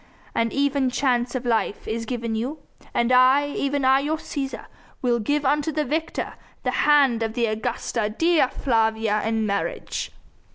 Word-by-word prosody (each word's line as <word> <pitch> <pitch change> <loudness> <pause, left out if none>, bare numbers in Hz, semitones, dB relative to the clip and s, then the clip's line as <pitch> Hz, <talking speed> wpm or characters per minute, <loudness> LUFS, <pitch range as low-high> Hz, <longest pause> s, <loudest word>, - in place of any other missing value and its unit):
An 230 0 0
even 280 -1 +1
chance 250 -1 0
of 255 -1 -3
life 225 -4 -1
is 225 0 -3
given 235 -2 -3
you! 245 +8 -3 0.3
And 235 +1 +1
I 260 +3 +5
even 280 -1 -1
I 265 +1 +5
your 300 +3 -1
Cæsar 275 -3 -5 0.4
will 240 -1 +2
give 290 +6 0
unto 295 +3 +1
the 305 0 -1
victor 315 +5 -2 0.3
the - - 0
hand 280 -6 +4
of 225 -1 -1
the 240 -1 +1
Augusta 220 0 -2
Dea 325 +5 +3
Flavia 220 -4 +1
in 225 0 0
marriage!" 200 -1 -3
250 Hz, 160 wpm, -24 LUFS, 225-285 Hz, 0.4 s, I